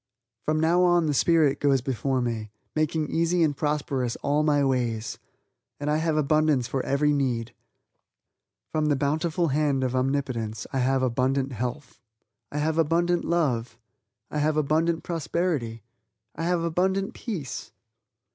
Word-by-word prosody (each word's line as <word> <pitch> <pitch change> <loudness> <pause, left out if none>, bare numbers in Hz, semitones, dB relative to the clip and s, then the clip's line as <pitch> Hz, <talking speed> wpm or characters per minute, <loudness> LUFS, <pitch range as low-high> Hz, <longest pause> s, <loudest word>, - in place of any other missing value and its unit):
From 155 0 +1
now 165 +3 +3
on 175 -2 +4
the 150 - +1
spirit 155 -1 +3
goes 140 -2 +3
before 130 +1 -1
me 115 -3 -3 0.3
making 155 0 0
easy 170 +1 +2
and 150 -3 +1
prosperous 140 -5 -1
all 145 +2 +2
my 145 -2 +3
ways 120 -4 -1 0.6
and 145 +1 -1
I 150 - +2
have 160 -1 0
abundance 155 -4 +2
for 130 +1 -2
every 145 +2 +2
need. 125 -5 -1 1.2
From 155 -1 +1
the 145 - +3
bountiful 155 +4 0
hand 140 -1 +1
of 130 0 -1
Omnipotence 130 -5 -1
I 135 - +1
have 130 +1 +2
abundant 130 +2 +1
health 125 +5 -5 0.5
I 150 - -4
have 155 +2 0
abundant 170 +2 +2
love 125 -9 0 0.5
I 150 - -1
have 155 +1 +1
abundant 160 +3 +1
prosperity 160 - -2 0.5
I 165 - -3
have 175 -1 +1
abundant 190 +4 0
peace. 175 - -5
145 Hz, 145 wpm, -26 LUFS, 130-160 Hz, 1.2 s, on